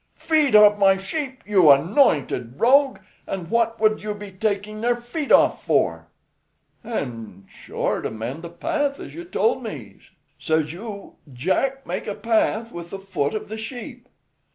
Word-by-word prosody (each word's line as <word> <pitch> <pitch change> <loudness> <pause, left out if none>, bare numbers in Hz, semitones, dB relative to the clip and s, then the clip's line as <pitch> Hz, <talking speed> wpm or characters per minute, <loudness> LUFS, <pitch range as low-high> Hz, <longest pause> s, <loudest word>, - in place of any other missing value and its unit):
"Feet 305 -7 +2
off 210 0 +7
my 195 -1 +5
sheep, 260 +6 -5
you 190 -7 +5
anointed 140 - +3
rogue! 270 +3 +4 0.3
and 180 -3 -5
what 230 -1 +1
would 215 0 +2
you 210 0 -4
be 205 -1 -9
taking 210 +2 -3
their 240 +1 +2
feet 240 +5 -5
off - - +4
for?" - - 0 0.8
"An', 115 - -6
sure, - - -3
to - - -3
mend 115 +8 -6
the 170 - -8
path 290 - -2
as - - -9
you 340 - -7
told 405 +6 0
me. - - -8 0.4
Says 160 -1 0
you, 200 +2 -9
'Jack, 260 - -1
make - - -4
a 205 - -3
path 225 0 0
with 170 0 -8
the 195 - -6
foot 195 -5 -2
of 215 - -4
the 220 - -6
sheep.'" 245 +2 -8
210 Hz, 160 wpm, -23 LUFS, 170-245 Hz, 0.8 s, off